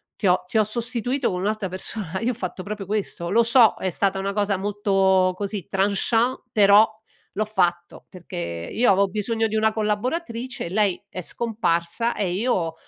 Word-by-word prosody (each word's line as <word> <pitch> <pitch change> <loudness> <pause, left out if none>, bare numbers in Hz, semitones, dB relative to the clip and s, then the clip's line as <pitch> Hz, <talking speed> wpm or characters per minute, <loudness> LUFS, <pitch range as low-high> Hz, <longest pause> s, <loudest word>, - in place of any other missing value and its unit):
ti 205 - -5
ho 180 0 +2
ti 220 - -1
ho 215 - +5
sostituito 240 +3 -2
con 180 0 -3
un'altra 210 -1 -1
persona." 190 -1 -3
Io 245 +2 +1
ho - - -6
fatto 185 -3 -5
proprio 205 -2 -6
questo. 195 -4 -2
Lo 230 +4 +4
so, 230 -1 +5
è 185 - -2
stata 195 +2 0
una 200 +1 -2
cosa 205 -2 0
molto 195 -2 +2
così 200 -2 -4
tranchant, 205 +5 +1
però 210 0 +6 0.5
l'ho 215 +1 0
fatto 175 -4 -1
perché 85 - -6
io 240 -3 +3
avo 195 +1 +3
bisogno 225 +3 -1
di 220 - -4
una 220 0 +2
collaboratrice, 230 - -2
lei 200 -1 0
è 185 - -6
scomparsa, 220 0 -1
e 190 -4 -1
io 185 -6 0
205 Hz, 170 wpm, -23 LUFS, 185-225 Hz, 0.5 s, però